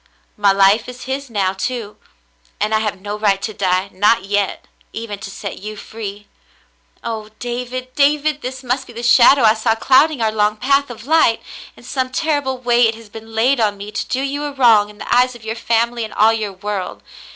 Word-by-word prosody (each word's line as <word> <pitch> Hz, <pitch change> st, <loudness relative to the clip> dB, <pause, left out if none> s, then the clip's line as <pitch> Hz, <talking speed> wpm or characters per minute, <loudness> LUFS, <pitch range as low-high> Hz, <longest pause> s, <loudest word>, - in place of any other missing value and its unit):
My 205 Hz, -1 st, +3 dB
life 195 Hz, +4 st, +3 dB
is 250 Hz, 0 st, -9 dB
his 270 Hz, +1 st, -4 dB
now, 195 Hz, -4 st, 0 dB
too, 215 Hz, +1 st, -4 dB, 0.6 s
and 210 Hz, +1 st, 0 dB
I 220 Hz, -, +3 dB
have 210 Hz, -3 st, -3 dB
no 205 Hz, +2 st, -5 dB
right 200 Hz, -2 st, +2 dB
to 215 Hz, -, -3 dB
die, 190 Hz, 0 st, 0 dB
not 205 Hz, +1 st, +2 dB
yet, 205 Hz, 0 st, -1 dB, 0.3 s
even 220 Hz, -3 st, -6 dB
to 195 Hz, -, -7 dB
set 200 Hz, 0 st, -7 dB
you 215 Hz, +2 st, -7 dB
free. 205 Hz, -1 st, -8 dB, 0.8 s
"Oh, 220 Hz, -2 st, -5 dB
David, 250 Hz, +1 st, -5 dB
David! 295 Hz, +1 st, +2 dB
This 260 Hz, +1 st, -6 dB
must 255 Hz, +2 st, -2 dB
be 240 Hz, -, -12 dB
the 235 Hz, +1 st, -7 dB
shadow 245 Hz, +2 st, +6 dB
I 215 Hz, -1 st, +6 dB
saw 225 Hz, 0 st, 0 dB
clouding 270 Hz, +5 st, +3 dB
our 220 Hz, -1 st, +1 dB
long 210 Hz, 0 st, +1 dB
path 275 Hz, +3 st, +1 dB
of 230 Hz, -1 st, -10 dB
light. 300 Hz, -7 st, +3 dB, 0.4 s
In -, -, -16 dB
some 260 Hz, 0 st, -2 dB
terrible 285 Hz, -2 st, -1 dB
way 240 Hz, -1 st, +3 dB
it 225 Hz, -, -2 dB
has 225 Hz, -1 st, -14 dB
been 225 Hz, +1 st, -11 dB
laid 250 Hz, +4 st, +3 dB
on 210 Hz, -2 st, +1 dB
me 200 Hz, +1 st, -8 dB
to -, -, -4 dB
do 260 Hz, -, -1 dB
you 285 Hz, +1 st, -3 dB
a 290 Hz, -, -3 dB
wrong 230 Hz, -6 st, +4 dB
in 210 Hz, -, -15 dB
the -, -, -1 dB
eyes 250 Hz, 0 st, +3 dB
of 230 Hz, -2 st, -13 dB
your 220 Hz, -, -2 dB
family 235 Hz, 0 st, 0 dB
and 220 Hz, -, -7 dB
all 220 Hz, +2 st, +5 dB
your 215 Hz, -3 st, -3 dB
world. 195 Hz, -1 st, -5 dB
225 Hz, 210 wpm, -18 LUFS, 210-255 Hz, 0.8 s, shadow